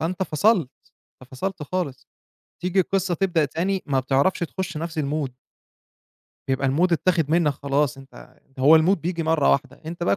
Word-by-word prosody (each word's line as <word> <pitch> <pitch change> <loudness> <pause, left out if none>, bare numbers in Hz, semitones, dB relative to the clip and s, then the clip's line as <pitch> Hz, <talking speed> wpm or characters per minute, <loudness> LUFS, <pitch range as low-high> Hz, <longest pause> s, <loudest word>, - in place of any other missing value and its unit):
فأنت 175 +4 -2
فصلت، 180 - +2 0.5
أنت 130 - -16
فصلت 175 +6 -4
خالص. 150 -3 -4 0.5
تيجي 180 +2 +1
القصة 190 0 0
تبدأ 175 -3 +1
تاني، 185 +7 -2
ما 135 -3 +1
بتعرفش 135 +7 +1
تخش 175 0 -4
نَفْس 165 0 -4
الmood 145 -1 -2 1.2
بيبقى 135 0 +1
الmood 170 +7 +2
اتّاخِد 165 -2 +1
منّك 165 -3 +3
خلاص 140 +1 -1
أنت 135 +1 -15 0.2
هو 150 +5 +7
الmood 175 +5 +3
بييجي 170 +1 -3
مرّة 160 -2 +2
واحدة، 140 0 -1
أنت 170 +2 -6
بقى 175 - +2
160 Hz, 160 wpm, -23 LUFS, 140-180 Hz, 1.2 s, هو